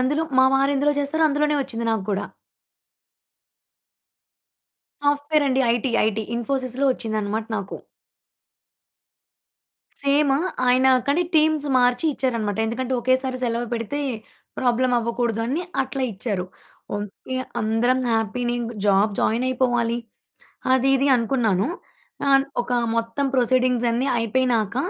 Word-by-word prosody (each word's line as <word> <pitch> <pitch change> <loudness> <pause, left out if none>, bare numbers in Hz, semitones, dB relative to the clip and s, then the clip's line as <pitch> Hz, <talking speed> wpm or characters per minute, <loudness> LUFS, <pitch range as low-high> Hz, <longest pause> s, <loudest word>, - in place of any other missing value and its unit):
అందులో 290 +5 +1 0.2
మా 260 - +7
వారెందులో 280 +2 +2
జేస్తారో 315 +3 +1
అందులోనే 295 +1 +1
ఒచ్చింది 235 -3 -4
నాకు 220 -3 -1
గూడా. 200 0 -1 2.8
సాఫ్ట్‌వెరండి. 285 -2 +2
ఐటీ. 240 +1 -2
ఐటీ. 220 0 -1
ఇన్‌ఫో‌సీస్‌లో 255 +2 -1
ఒచ్చిందనమాట 215 -2 -3
నాకు. 200 -1 -5 2.2
సేమ్. 280 0 +2 0.3
ఆయన 255 +1 +4 0.2
కానీ, 290 +5 +2
టీమ్స్ 310 -1 +3
మార్చి 245 +2 +2
ఇచ్చారనమాట. 225 -6 -1
ఎందుకంటే, 255 +3 -3
ఒకేసారి 255 +1 0
సెలవ 235 0 -1
పెడితే 230 +6 -3 0.6
ప్రాబ్లమవ్వకూడదు 240 -2 0
అని 290 +8 -1 0.2
అట్లా 270 0 -4
ఇచ్చారు. 195 -2 -3 0.5
ఓకే. 205 +5 -6 0.2
అందరం 235 +4 +1
హ్యాపీనే 225 +2 -1
ఇంగ 235 0 -4
జాబ్ 200 +2 +3
జాయినయిపోవాలి, 240 0 +1 0.8
అది, 260 +1 +3
ఇది 275 - +1
అనుకున్నాను. 230 -5 +1 0.6
ఆహ్, 270 0 +5 0.2
ఒకా 245 0 -1 0.2
మొత్తం 230 +5 -1
ప్రొసీడింగ్సన్ని 250 0 +2
అయిపోయినాక, 230 -2 0
250 Hz, 100 wpm, -23 LUFS, 230-270 Hz, 2.8 s, మా